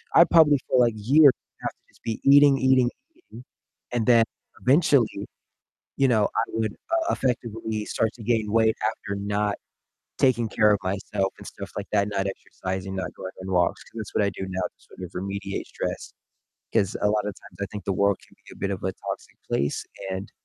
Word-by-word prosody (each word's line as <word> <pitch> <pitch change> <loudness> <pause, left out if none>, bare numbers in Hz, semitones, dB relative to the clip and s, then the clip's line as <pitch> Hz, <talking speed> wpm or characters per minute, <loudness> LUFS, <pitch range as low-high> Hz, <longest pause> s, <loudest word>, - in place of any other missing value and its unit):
I'd 170 - +8
probably 150 -5 +6
for, 130 - +4
like, 120 -2 +4
years 140 +7 +6 0.3
have - - -1
to - - -37 0.2
just - - -25
be 115 -1 -3
eating, 140 0 +7
eating, 130 -2 +4 0.3
eating, 125 - -14 0.5
and 115 -2 0
then, 115 -2 +6 0.4
eventually, 130 - +3 0.7
you 135 - +4
know, 110 -4 +3
I - - +2
would, 110 -2 -1 0.2
uh, 335 0 +1
effectively 115 -4 -2
start 110 -1 0
to 115 - -10
gain 110 -2 0
weight 110 0 +3
after 100 -2 -4
not 105 +1 -1 0.6
taking 120 -3 +3
care 105 -1 +4
of 100 - +2
myself 95 +1 -1
and - - -12
stuff - - -8
like - - -4
that, 100 0 +2
not 100 -1 -1
exercising, 95 0 -5
not 95 -1 -4
going 95 0 -7
on 95 0 -5
walks, 90 -1 +1
'cause - - -15
that's 110 - -7
what 105 - +3
I 100 - +2
do 95 - -5
now 95 0 -3
to - - -5
sort - - -18
of 90 - -7
remediate 100 +1 -4
stress, - - -5 0.6
'cause 100 -4 +1
a 105 - +3
lot 105 -1 +1
of 105 - -2
times - - -16
I - - -1
think 105 - -6
the 100 - 0
world 100 0 +2
can - - -23
be - - -12
a - - -17
bit 100 - -2
of 95 - -5
a 95 - 0
toxic - - -7
place 70 +1 0 0.3
and, 95 +1 -4
105 Hz, 205 wpm, -25 LUFS, 100-120 Hz, 0.7 s, I'd